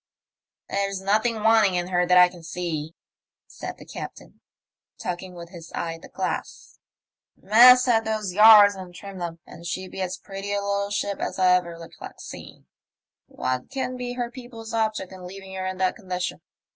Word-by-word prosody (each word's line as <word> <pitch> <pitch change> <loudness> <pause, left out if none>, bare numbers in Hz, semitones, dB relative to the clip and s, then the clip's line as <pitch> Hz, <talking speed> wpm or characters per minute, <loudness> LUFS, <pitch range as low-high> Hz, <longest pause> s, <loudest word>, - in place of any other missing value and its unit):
There's 195 -1 -1
nothing 215 +3 +1
wanting 220 -4 +5
in 175 0 -1
her 180 -1 +1
that 180 0 +5
I 180 0 +9
can 175 -1 -13
see," 165 -2 -4 0.5
said - - -8
the - - -13
captain, - - -9 0.6
talking 180 +1 -5
with 170 -1 -9
his 170 -2 -11
eye 165 -1 -3
at 165 - -11
the - - -13
glass. - - -5 0.3
" - - -69
Masthead 240 +2 +6
those 215 -4 -2
yards 210 0 +9
and 185 -2 -10
trim 195 0 -9
them, 170 -1 -4
and 170 - -13
she'd 185 +2 -4
be 190 - -6
as 185 0 -3
pretty 195 +1 -6
a - - +1
little 200 0 -1
ship 205 0 -2
as - - -3
ever 180 -2 +3
I - - -13
recollect 165 - -11
seeing. - - -10 0.6
What 130 0 -3
can 265 -2 -3
be 250 -1 -4
her 245 -1 -3
people's 240 -3 -10
object 215 -4 -1
in 185 -1 -9
leaving 195 +1 -10
her 185 0 -3
in 185 0 -4
that 185 -1 +1
condition 185 -3 -4
190 Hz, 185 wpm, -25 LUFS, 180-215 Hz, 0.6 s, I